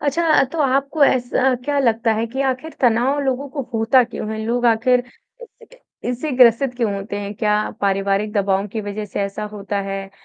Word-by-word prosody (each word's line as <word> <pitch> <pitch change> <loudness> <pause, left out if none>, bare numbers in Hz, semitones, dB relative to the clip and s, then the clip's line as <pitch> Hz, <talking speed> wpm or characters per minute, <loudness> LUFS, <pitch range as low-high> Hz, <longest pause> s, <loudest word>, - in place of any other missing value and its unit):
अच्छा 295 +4 0
अ, 310 - +5
तो 330 - -4
आपको 275 +2 +2
ऐसा 255 0 +2
क्या 290 +1 0
लगता 230 -3 +2
है 225 +1 -1
कि 260 +4 -5
आखिर 270 +4 -2
तनाव 245 +3 +2
लोगों 275 0 -2
को 275 +1 -4
होता 225 +3 +4
क्यों 225 -2 -6
है? 220 - -5
लोग 240 +2 0
आखिर 240 +2 +3 0.4
1 485 - -11 0.2
सेकंड - - -18 0.3
इससे 250 +5 -3
ग्रसित 245 +1 +5
क्यों 230 -4 0
होते 200 +1 -5
हैं, 200 0 -5
क्या 210 0 0
पारिवारिक 195 +1 0
दबाव 200 -1 +1
की 220 +2 -4
वजह 205 +1 -5
से 205 - -5
ऐसा 200 +1 -3
होता 205 -1 -4
है, 195 0 -5
230 Hz, 200 wpm, -20 LUFS, 205-265 Hz, 0.4 s, अ